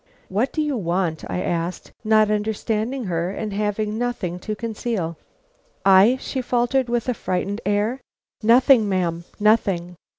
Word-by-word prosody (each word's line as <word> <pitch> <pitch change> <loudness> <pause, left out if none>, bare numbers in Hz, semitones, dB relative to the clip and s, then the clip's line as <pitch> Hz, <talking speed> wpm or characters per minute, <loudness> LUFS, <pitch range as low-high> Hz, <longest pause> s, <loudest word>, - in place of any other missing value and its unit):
"What 215 +8 0
do 310 - 0
you 295 -2 -1
want?" 175 -4 -1
I 180 - -2
asked, 170 +1 -3
not 215 -1 +4
understanding 220 +4 -1
her 175 -3 -1
and 205 +1 -4
having 210 +1 -1
nothing 210 -8 -2
to 215 +3 -4
conceal. 215 -6 -3 0.7
"I?" 195 +6 +6
she 260 - -3
faltered, 245 +1 +1
with 240 0 -1
a 250 - +1
frightened 200 0 -3
air. 210 +6 0 0.4
"Nothing, 235 0 +5
ma'am, 170 -3 -1
nothing." 195 -5 +2
210 Hz, 140 wpm, -22 LUFS, 185-235 Hz, 0.7 s, I